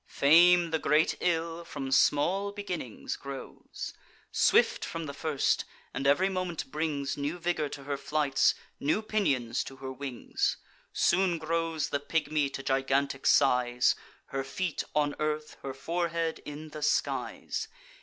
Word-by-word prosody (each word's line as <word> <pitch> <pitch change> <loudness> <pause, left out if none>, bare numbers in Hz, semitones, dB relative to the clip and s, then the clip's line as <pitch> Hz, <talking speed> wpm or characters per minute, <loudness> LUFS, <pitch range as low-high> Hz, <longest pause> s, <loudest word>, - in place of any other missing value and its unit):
Fame, 170 +3 +5
the 160 - +1
great 155 +1 +3
ill, 165 -1 0
from 135 -5 -5
small 180 +9 +3
beginnings 180 - -5
grows: 140 -1 -8 0.4
Swift - - +4
from 165 -1 -4
the 140 - -5
first; 145 -1 +1 0.3
and 135 - -1
ev'ry 160 +7 +4
moment 185 -7 -3
brings 150 -3 -2
New 145 +4 -2
vigour 170 -3 -1
to 140 - -8
her 140 0 -3
flights, 140 -1 +2 0.2
new 155 +10 +1
pinions 145 - 0
to 135 - -9
her 130 0 -6
wings. 130 -2 -2 0.3
Soon 180 -1 +2
grows 165 -1 -1
the 145 - 0
pigmy 150 -1 0
to 135 0 -6
gigantic 135 +1 +1
size; 125 -3 +4 0.3
Her 135 0 -3
feet 160 +5 -2
on 145 -1 +2
earth, 150 0 -2
her 135 - -4
forehead 165 +2 -1
in 150 +1 -7
the 150 0 -8
skies. 150 - -1
150 Hz, 140 wpm, -29 LUFS, 140-170 Hz, 0.4 s, Fame